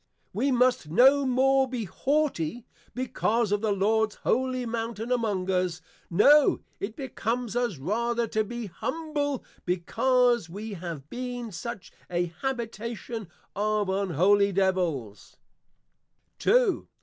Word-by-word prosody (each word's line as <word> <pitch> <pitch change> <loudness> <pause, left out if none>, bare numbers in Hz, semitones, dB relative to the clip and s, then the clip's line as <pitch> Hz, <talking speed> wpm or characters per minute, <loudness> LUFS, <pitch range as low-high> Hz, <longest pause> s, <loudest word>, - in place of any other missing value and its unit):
We 275 - +1
must 250 -9 +2
no 265 - +5
more 265 +1 +3
be 245 -3 -3
Haughty, 245 - -1 0.3
because 235 -3 0
of 205 0 +1
the 220 -2 +1
Lords 215 +2 +1
Holy 255 -1 0
Mountain 230 0 -4
among 205 -6 0
us; 180 -2 0 0.3
No 280 - +5 0.2
it 215 +3 -4
becomes 245 -4 -3
us 240 -8 0
rather 235 - 0
to 215 -1 +1
be, 240 +2 -5
Humble, 290 - -3 0.2
because 240 +4 +2
we 205 +4 -6
have 165 -6 -7
been 245 -2 -5
such 235 0 -7 0.2
an 175 -1 -1
Habitation 235 -3 -4 0.3
of 210 -1 0
Unholy 195 +2 +3
Devils! 175 - -1 1.0
_II. - - +3
225 Hz, 115 wpm, -27 LUFS, 190-250 Hz, 1.0 s, no